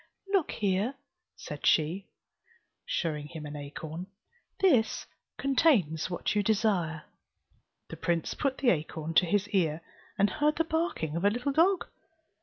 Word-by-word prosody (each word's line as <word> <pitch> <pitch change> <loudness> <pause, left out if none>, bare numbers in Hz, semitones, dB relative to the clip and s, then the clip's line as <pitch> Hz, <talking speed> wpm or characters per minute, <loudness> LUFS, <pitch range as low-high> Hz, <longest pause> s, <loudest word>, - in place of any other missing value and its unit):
"Look 380 -6 +3
here," 205 +5 0 0.4
said 150 -1 -8
she, 165 +5 +2 0.8
showing 150 -3 -2
him 155 -1 -8
an 150 0 -7
acorn, 155 +4 -6 0.5
"this 265 -13 +3 0.3
contains 250 - +2
what 175 - -1
you 210 - +2
desire." 195 -7 +1 0.9
The - - -7
prince 170 -1 -1
put 275 -2 -1
the 260 -3 +4
acorn 160 0 -3
to 180 +2 +5
his 205 +3 +1
ear, 170 -6 +1 0.4
and 200 - +4
heard 300 +6 +2
the 330 - +2
barking 320 - -1
of 170 - -2
a 205 - +6
little 245 +6 -1
dog. 350 +5 +3
190 Hz, 140 wpm, -29 LUFS, 160-260 Hz, 0.9 s, a